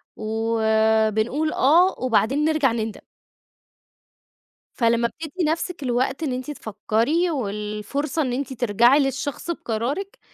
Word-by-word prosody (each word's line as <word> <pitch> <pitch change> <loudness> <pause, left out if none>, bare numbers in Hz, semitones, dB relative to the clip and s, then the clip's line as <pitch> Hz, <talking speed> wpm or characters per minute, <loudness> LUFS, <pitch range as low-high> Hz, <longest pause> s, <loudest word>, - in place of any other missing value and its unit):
وبنقول 220 +4 +1
آه، 340 +7 +4
وبعدين 255 +3 +1
نرجع 310 -5 +2
نِندَم. 225 -1 -4 1.7
فلما 235 -1 +2
بتدي 320 +7 -5
نفسِك 330 +1 -2
الوقت 260 +4 -1
إن 275 -5 -1
أنتِ 255 +4 -4
تفكري 235 - 0
والفرصة 215 +5 -3
إن 255 -4 -1
أنتِ 270 +1 -3
ترجعي 240 +3 +4
للشخص 275 +3 -2
بقرارِك، 280 - -3
255 Hz, 105 wpm, -23 LUFS, 220-300 Hz, 1.7 s, آه